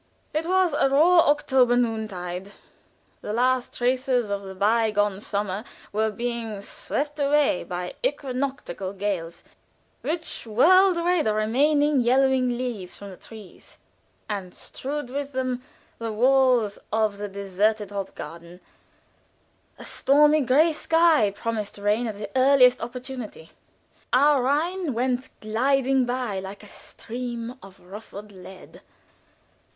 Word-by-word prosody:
It 315 +2 -1
was 370 -3 +2
a 275 - +2
raw 325 +4 +5
October 260 -4 +3
noontide. 200 -5 -3 0.7
The 210 - -5
last 250 +2 0
traces 250 -2 0
of 200 0 -2
the 190 -1 -9
by 220 +3 +2
gone 205 -2 0
summer 205 -1 -3 0.3
were 220 +1 +1
being 230 -1 -4
swept 295 +7 -4
away 285 -7 +2
by 180 0 -5
equinoctial 260 - -3
gales, 185 -4 -4 0.6
which 325 -6 -4
whirled 365 - +5
the 340 -9 +1
remaining 285 +6 +2
yellowing 260 +1 +3
leaves 235 -8 -5
from 200 -1 -9
the - - -10
trees, 215 0 -14 0.5
and 195 -4 -5
strewed 285 -1 -6
with 280 +1 -4
them 255 -1 -2 0.4
the 230 -1 -3
walks 250 -2 +3
of 215 -2 0
the 205 - -3
deserted 200 +1 -1
Hofgarten; 175 -3 -7 1.2
a - - -10
stormy 295 +2 +4
gray 295 +6 +3
sky 325 -7 +3
promised 215 0 -4
rain 210 +4 0
at 215 -2 -5
the 210 - -7
earliest 260 -1 +5
opportunity; 245 -7 -7 0.6
our 280 +1 +4
Rhine 305 +3 0
went 250 +1 -1
gliding 260 +4 +1
by 245 -5 -2
like 195 +2 -8
a - - -11
stream 235 +2 -7
of 195 -1 -14
ruffled 205 +2 -11
lead. 190 0 -13
240 Hz, 125 wpm, -24 LUFS, 205-275 Hz, 1.2 s, raw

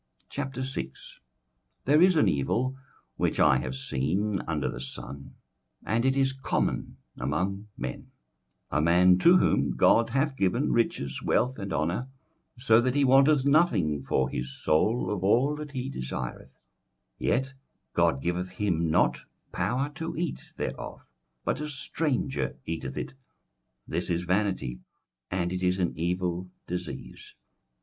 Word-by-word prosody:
21:006:001 130 - -5 0.7
There 150 +4 +5
is 185 0 +6
an 155 - +4
evil 120 - 0 0.4
which - - 0
I - - +6
have 65 +1 -4
seen 90 +10 -1
under 75 -3 -1
the - - -4
sun, 65 +1 -9 0.5
and 115 +3 +1
it 135 +1 +2
is 135 -1 +2
common 135 0 -2 0.2
among 95 - -2
men: - - -5 0.6
21:006:002 - - +1
A - - +3
man 90 +3 +5
to 175 - +7
whom - - +2
God 115 0 +5
hath 135 +1 0
given 110 +6 +1
riches, 70 - 0
wealth, 125 0 +1
and 100 -1 -5
honour, 85 +12 -1 0.5
so 120 -2 +5
that 130 +2 0
he 145 - +4
wanteth 135 +1 +5
nothing 110 - +3
for 65 -1 +1
his 65 0 -4
soul 105 +12 +2
of 100 -3 -2
all 125 +9 +3
that 150 -1 -7
he 130 -1 -3
desireth, 65 - -5 0.6
yet 130 +2 0 0.4
God 65 0 +2
giveth 90 +1 -1
him 90 -4 0
not 80 - +2 0.3
power 135 +6 -1
to 165 +1 -5
eat 170 -1 -4
thereof, - - -5 0.4
but - - 0
a 150 - -3
stranger 140 - -2
eateth 80 0 -4
it: - - -4 0.7
this - - -2
is 85 0 0
vanity, 95 -9 0 0.5
and 90 -1 -1
it 90 - -3
is 90 0 +2
an 90 -2 0
evil 90 +2 -1 0.2
disease. 90 0 -7
100 Hz, 140 wpm, -28 LUFS, 85-135 Hz, 0.7 s, to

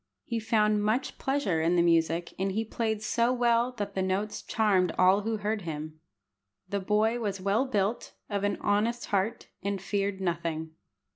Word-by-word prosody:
He 235 -2 -2
found 215 -2 +2
much 220 +5 -1
pleasure 250 - 0
in 170 +2 +2
the 170 - +4
music, 165 0 +2
and 195 0 0
he 220 +3 -1
played 220 -1 -2
so 235 +2 +2
well 240 0 +2
that 205 -4 -4
the 190 - -1
notes 190 +3 -1
charmed 195 -6 +2
all 185 +2 +5
who 220 +1 -1
heard 210 +1 -2
him. 155 -2 -6 0.7
The 200 +2 -1
boy 215 +4 +1
was 200 -4 -2
well 200 +8 +1
built, 210 -1 -1
of 200 -1 -2
an 205 - 0
honest 220 +4 +1
heart, 205 +4 0
and 200 0 -2
feared 200 0 -1
nothing. 170 -3 -2
205 Hz, 170 wpm, -29 LUFS, 185-225 Hz, 0.7 s, all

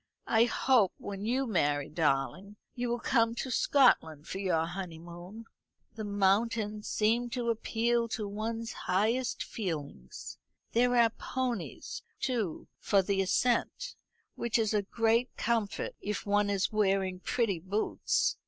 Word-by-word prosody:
"I 225 +1 +4
hope 240 -4 +3
when 200 0 -6
you 255 +4 +1
marry, 145 - +1
darling, 160 +6 0 0.2
you 245 -1 -2
will 240 - 0
come 230 -1 +2
to 260 - -3
Scotland 160 - +3
for 190 - -4
your 175 -5 +1
honeymoon. 175 +3 -8 0.5
The 220 0 -6
mountains 210 +1 +1
seem 230 +3 +1
to 235 -1 0
appeal 230 +1 0
to 220 -2 -3
one's 225 +3 -4
highest 225 +7 0
feelings. 145 - -6 0.3
There 245 +1 +3
are 230 -1 +5
ponies, 245 -4 -4 0.2
too, 225 -10 -2
for 200 -2 +3
the 195 0 +1
ascent; 245 - +1 0.4
which 235 -1 0
is 220 -1 +1
a 210 - +3
great 230 +4 +1
comfort 225 -2 -1
if 210 0 -3
one 205 0 +2
is 200 -1 +1
wearing 195 -3 +1
pretty 200 -3 0
boots. 195 +5 0
210 Hz, 135 wpm, -31 LUFS, 190-235 Hz, 0.5 s, are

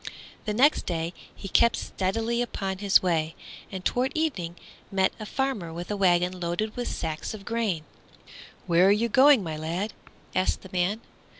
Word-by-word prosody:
The 210 - -1
next 280 +6 +4
day 170 0 -2 0.2
he 195 - -8
kept 235 +5 +4
steadily 225 +5 -1
upon 195 -5 -3
his 200 -2 +4
way, 165 -3 0 0.4
and 185 -2 -6
toward 255 +2 +1
evening 200 - -1 0.4
met 190 -1 +2
a 215 - -6
farmer 265 -12 -2
with 175 +4 -6
a - - 0
wagon 180 -1 +2
loaded 175 +5 -2
with 245 -1 -3
sacks 160 +5 -3
of 195 -2 -11
grain. 220 -9 -1 0.8
"Where 175 +1 +5
are - - +6
you 225 +3 +2
going, 265 -1 +6
my 160 -3 -4
lad?" 170 +7 -3 0.4
asked 185 0 +1
the 190 - -12
man. 185 +5 0
190 Hz, 170 wpm, -27 LUFS, 175-225 Hz, 0.8 s, are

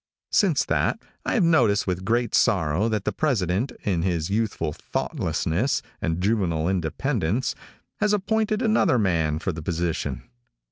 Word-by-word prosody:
Since - - +3
that, - - 0 0.3
I - - +1
have 220 - +3
noticed 120 -12 +3
with 90 -1 -2
great 120 +3 0
sorrow 95 -2 +2
that 110 -2 -2
the - - +1
President, 115 - 0
in 90 -5 0
his 85 -1 -1
youthful 105 -8 -1
thoughtlessness 105 - -1 0.2
and 80 0 -1
juvenile 90 -5 +1
independence, 95 - -1 0.5
has 210 0 +2
appointed 215 +2 +1
another 215 - +3
man 85 -7 +1
for 90 - -2
the 80 -1 -6
position. 85 -5 -2
100 Hz, 140 wpm, -24 LUFS, 85-125 Hz, 0.5 s, Since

